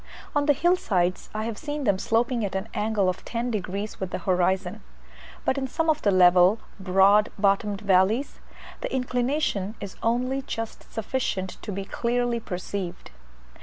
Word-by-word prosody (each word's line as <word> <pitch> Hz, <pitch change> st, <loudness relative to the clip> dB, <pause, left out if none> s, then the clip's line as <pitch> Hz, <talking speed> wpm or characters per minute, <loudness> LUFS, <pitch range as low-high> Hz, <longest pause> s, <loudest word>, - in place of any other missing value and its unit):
On 290 Hz, 0 st, +2 dB
the 290 Hz, -, +6 dB
hill 345 Hz, +6 st, +3 dB
sides 185 Hz, -, 0 dB
I 215 Hz, 0 st, -3 dB
have 225 Hz, -1 st, -4 dB
seen 295 Hz, -1 st, -4 dB
them 200 Hz, -6 st, +2 dB
sloping 235 Hz, +2 st, +1 dB
at 195 Hz, -2 st, -3 dB
an 190 Hz, +3 st, -3 dB
angle 210 Hz, -2 st, +1 dB
of 185 Hz, -, -2 dB
ten 240 Hz, +1 st, -3 dB
degrees 200 Hz, 0 st, -4 dB
with 190 Hz, -, -3 dB
the -, -, -3 dB
horizon; 185 Hz, 0 st, 0 dB, 0.6 s
but 275 Hz, -, +1 dB
in 265 Hz, -, -2 dB
some 320 Hz, +4 st, +1 dB
of 305 Hz, -, -2 dB
the 205 Hz, -, +2 dB
level, 180 Hz, +1 st, +6 dB, 0.2 s
broad 195 Hz, +2 st, +4 dB
bottomed 200 Hz, 0 st, +1 dB
valleys, 200 Hz, +6 st, +2 dB, 0.4 s
the -, -, -4 dB
inclination 250 Hz, -5 st, -1 dB
is 200 Hz, -2 st, -8 dB
only 250 Hz, +4 st, 0 dB
just 225 Hz, -4 st, -6 dB
sufficient 215 Hz, -5 st, -3 dB
to 210 Hz, -, -5 dB
be 195 Hz, 0 st, -4 dB
clearly 240 Hz, +2 st, 0 dB
perceived. 180 Hz, -, -5 dB
210 Hz, 165 wpm, -26 LUFS, 190-245 Hz, 0.6 s, the